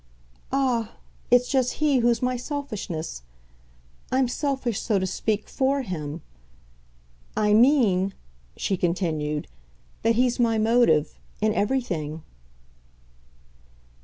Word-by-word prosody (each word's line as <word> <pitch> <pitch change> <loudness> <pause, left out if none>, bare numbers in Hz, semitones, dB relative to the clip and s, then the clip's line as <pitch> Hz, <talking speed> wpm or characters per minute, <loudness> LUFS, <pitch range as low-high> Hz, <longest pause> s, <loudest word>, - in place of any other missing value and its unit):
"Ah, 250 -5 0 0.4
it's 245 0 +5
just 260 -2 +1
he 295 -4 +2
who's 240 +1 +2
my 250 0 +1
selfishness. 230 - -5 0.9
I'm 260 0 +3
selfish, 265 -4 -2
so 215 -3 +1
to 190 - 0
speak, 210 +3 -2
FOR 275 0 0
him. 155 - -5 1.1
I 210 -1 +3
mean," 215 -6 +4 0.4
she 195 - -1
continued, 160 -4 -1 0.5
"that 230 0 +2
he's 245 +1 +2
my 230 -2 +3
motive 220 -9 +3 0.2
in 215 0 +2
everything." 175 - -1
230 Hz, 105 wpm, -25 LUFS, 185-255 Hz, 1.1 s, it's